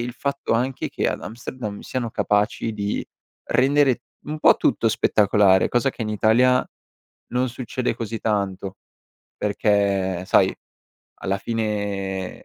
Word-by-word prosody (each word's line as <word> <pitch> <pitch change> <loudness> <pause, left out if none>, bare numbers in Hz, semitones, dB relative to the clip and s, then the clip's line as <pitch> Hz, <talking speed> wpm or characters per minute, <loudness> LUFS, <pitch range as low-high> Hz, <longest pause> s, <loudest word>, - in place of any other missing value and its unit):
il 120 +1 -3
fatto 140 0 -2
anche 125 +3 -1
che - - -1
ad - - -3
Amsterdam 110 -2 -6
siano 120 -3 -3
capaci 105 +2 0
di 105 -1 -2 0.4
rendere 135 -2 +3 0.2
un 155 +1 -4
po' - - +6
tutto - - +2
spettacolare, 100 -2 +3
cosa 125 +3 +1
che 120 - -6
in 110 - -3
Italia 120 +4 +3 0.6
non 125 +1 0
succede 125 0 -3
così 115 -1 -4
tanto 100 -3 -2 0.6
perché 100 -3 +1
sai, - - +4 0.7
alla 100 +1 -1
fine 100 -3 -3
110 Hz, 125 wpm, -23 LUFS, 100-125 Hz, 0.7 s, po